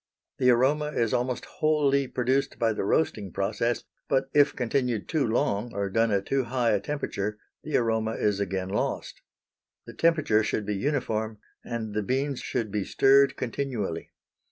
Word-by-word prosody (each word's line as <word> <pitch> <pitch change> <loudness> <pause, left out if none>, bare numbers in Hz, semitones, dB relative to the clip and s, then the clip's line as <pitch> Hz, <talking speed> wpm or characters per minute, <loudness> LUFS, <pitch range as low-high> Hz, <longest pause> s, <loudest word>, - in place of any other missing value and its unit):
The 125 - +4
aroma 135 +5 +3
is 115 -2 0
almost 125 0 -1
wholly 145 -3 +1
produced 130 +3 0
by 115 -1 +2
the 105 - -2
roasting 100 - 0
process, 110 +5 -1 0.3
but 135 0 +1
if 145 0 +4
continued 125 -3 -1
too 155 -6 +1
long 110 0 0
or 100 -1 -2
done 115 +2 +2
at 100 -2 0
too 135 -2 0
high 120 -1 +1
a 105 - +2
temperature 105 -4 -3 0.2
the 155 - 0
aroma 110 -1 0
is 105 -1 0
again 95 -1 -2
lost. 105 - -3 0.6
The - - -10
temperature 155 -10 +3
should 105 0 -1
be 105 - -1
uniform 110 -3 -1 0.3
and 110 -3 -4
the 105 - 0
beans 135 +5 -1
should 115 -5 -3
be 105 -1 -1
stirred 135 +6 +4
continually. 120 -8 -3
115 Hz, 160 wpm, -27 LUFS, 105-135 Hz, 0.6 s, The